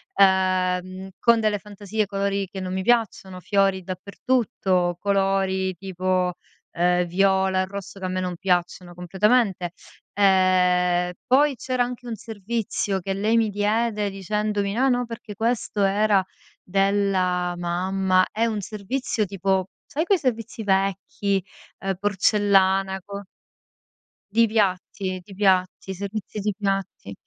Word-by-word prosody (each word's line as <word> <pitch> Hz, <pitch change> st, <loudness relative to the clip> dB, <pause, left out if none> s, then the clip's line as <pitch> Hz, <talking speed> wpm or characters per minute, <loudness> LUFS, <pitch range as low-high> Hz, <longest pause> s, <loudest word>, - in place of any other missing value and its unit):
uhm, 185 Hz, -1 st, +2 dB
con 235 Hz, -1 st, +4 dB
delle 215 Hz, -2 st, +1 dB
fantasie, 210 Hz, +1 st, -3 dB
colori 200 Hz, 0 st, -1 dB
che 190 Hz, -, -8 dB
non 185 Hz, 0 st, -4 dB
mi 190 Hz, -, -1 dB
piacciono, 195 Hz, -5 st, 0 dB
fiori 195 Hz, -1 st, +1 dB
dappertutto, 185 Hz, -2 st, -1 dB
colori 195 Hz, -1 st, +1 dB
tipo, 185 Hz, 0 st, -1 dB, 0.4 s
uhm, 180 Hz, +1 st, +2 dB
viola 190 Hz, +1 st, +2 dB
e 185 Hz, -, 0 dB
rosso, 195 Hz, 0 st, -8 dB
che 190 Hz, -, -5 dB
a -, -, 0 dB
me 185 Hz, 0 st, -2 dB
non 180 Hz, -1 st, -3 dB
piacciono 175 Hz, -1 st, -1 dB
completamente, 190 Hz, +1 st, +1 dB, 0.4 s
ehm, 180 Hz, -2 st, +3 dB, 0.2 s
poi 280 Hz, +2 st, +4 dB
c'era 255 Hz, +1 st, 0 dB
anche 245 Hz, 0 st, -6 dB
un 230 Hz, -, -3 dB
servizio 210 Hz, -2 st, -3 dB
che 195 Hz, +2 st, -2 dB
lei 215 Hz, +4 st, +1 dB
mi 225 Hz, -1 st, +2 dB
diede 210 Hz, +1 st, 0 dB
dicendomi: 205 Hz, +1 st, -2 dB
"No 260 Hz, +5 st, +2 dB
no, 245 Hz, -1 st, +1 dB
perché 230 Hz, -2 st, -8 dB
questo 220 Hz, -2 st, -1 dB
era 200 Hz, 0 st, +3 dB, 0.4 s
della 190 Hz, -2 st, +1 dB
mamma." 185 Hz, +2 st, +1 dB
È 225 Hz, +2 st, +1 dB
un 215 Hz, -2 st, -2 dB
servizio 215 Hz, +3 st, -2 dB
tipo, 190 Hz, -1 st, 0 dB, 0.2 s
sai 315 Hz, +3 st, -2 dB
quei 395 Hz, +1 st, +3 dB
servizi 235 Hz, -3 st, -3 dB
vecchi, 195 Hz, 0 st, 0 dB, 0.4 s
uhm, 195 Hz, 0 st, -1 dB
porcellana, 195 Hz, -1 st, +2 dB
co 200 Hz, 0 st, -7 dB, 1.1 s
Di 230 Hz, +1 st, +5 dB
piatti, 190 Hz, -2 st, -1 dB
di 195 Hz, +2 st, -14 dB
piatti, 190 Hz, -1 st, +1 dB
servizi 200 Hz, +2 st, -5 dB
di 210 Hz, +1 st, -1 dB
piatti, 195 Hz, -, -3 dB
195 Hz, 130 wpm, -24 LUFS, 185-210 Hz, 1.1 s, Di